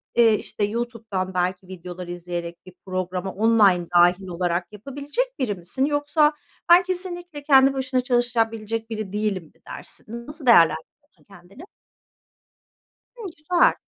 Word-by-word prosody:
eee, 230 -2 +5
işte 210 - -4
YouTube'dan 220 -4 -3
belki 180 +1 -1
videolar 180 -1 -8
izleyerek, 175 0 -6
bir 185 - -13
programa 185 0 -3
online 205 -5 +3
dâhil 180 +2 +4
olarak, 175 0 -2
yapabilecek 285 - -4
biri 225 -6 -1
misin? 185 +10 -2
Yoksa, 295 +1 +2 0.4
ben 350 +1 +8
kesinlikle 350 -4 -5
kendi 270 -1 +5
başına 260 -1 -1
çalışabilecek 225 -2 -1
biri 215 -3 -5
değilim 210 -3 -1
mi 155 - -23
dersin? 235 +2 -9
Nasıl 295 -1 -8
değerlendiriyorsun 230 - +2
kendini? 195 - -15 1.5
Hımm, 455 -4 -7
güzel. 345 +3 +3
220 Hz, 125 wpm, -23 LUFS, 185-275 Hz, 1.5 s, ben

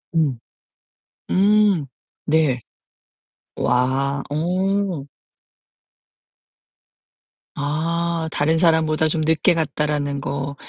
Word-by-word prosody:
음. 140 -7 +1 0.9
음 200 -4 +3 0.4
네. 150 -5 +2 1.0
와, 135 +3 0
어. 180 +1 -1 2.5
아 165 +2 -2
다른 160 +3 +1
사람보다 160 -2 +3
좀 155 0 -1
늦게 160 +3 +3
갔다라는 150 -2 -1
거 140 +1 -4
155 Hz, 110 characters per minute, -21 LUFS, 140-170 Hz, 2.5 s, 음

